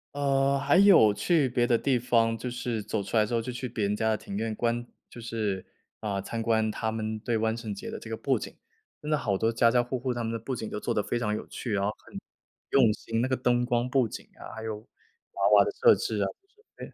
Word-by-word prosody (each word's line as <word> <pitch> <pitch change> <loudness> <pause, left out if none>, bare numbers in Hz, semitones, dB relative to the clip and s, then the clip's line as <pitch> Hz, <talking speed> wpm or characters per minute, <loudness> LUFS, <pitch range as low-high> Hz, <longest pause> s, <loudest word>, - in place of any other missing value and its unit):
呃， 140 -1 +2
还 145 +5 +3
有 185 - +7
去 150 - +2
别 120 -1 +1
的 120 - +3
地 130 -2 +1
方， 115 -1 +2
就 125 +2 -4
是 120 -2 -3
走 100 0 -3
出 100 +4 -2
来 105 - +4
之 115 - -5
后 115 - +2
就 125 +3 -5
去 125 +1 -5
别 110 -3 -3
人 100 - 0
家 110 +1 +1
的 - - +2
庭 100 - -7
院 110 0 -2
观 120 +1 -1 0.2
就 - - -11
是， 110 -5 -3 0.3
啊， 100 -2 -2
参 115 +3 -4
观 110 -1 +1
他 110 +1 -2
们 110 0 -3
对 115 +1 -1
万 110 +1 0
圣 110 -3 -5
节 - - -7
的 - - -6
这 110 - -10
个 110 - -2
布 130 -1 0
景。 - - -8 0.5
真 150 +1 -4
的 150 - +3
好 100 -8 -1
多 115 +3 +1
家 115 0 +4
家 120 +1 +3
户 125 +1 -3
户 130 0 -2
他 120 -1 -3
们 115 - -2
的 115 - -3
布 130 +3 -4
景 110 -1 -5
都 - - -4
做 - - -2
得 105 - 0
非 120 - -2
常 105 -3 -1
有 - - -5
趣， 115 - -5
然 100 -1 0
后 100 - +1 0.2
很 - - -10 0.5
用 120 -6 +4
心， 115 +1 -4
那 125 - +1
个 130 - +1
灯 125 -1 +1
光 120 0 0
布 130 -3 +2
景 - - -8
啊， - - -9
还 110 - -7
有 110 -1 -4 0.6
娃 - - +2
娃 - - +7
的 425 - -1
设 470 +1 +6
置 - - -2
啊 - - +2 0.5
之 - - -7
类。 - - -15
115 Hz, 290 characters per minute, -28 LUFS, 110-125 Hz, 0.6 s, 有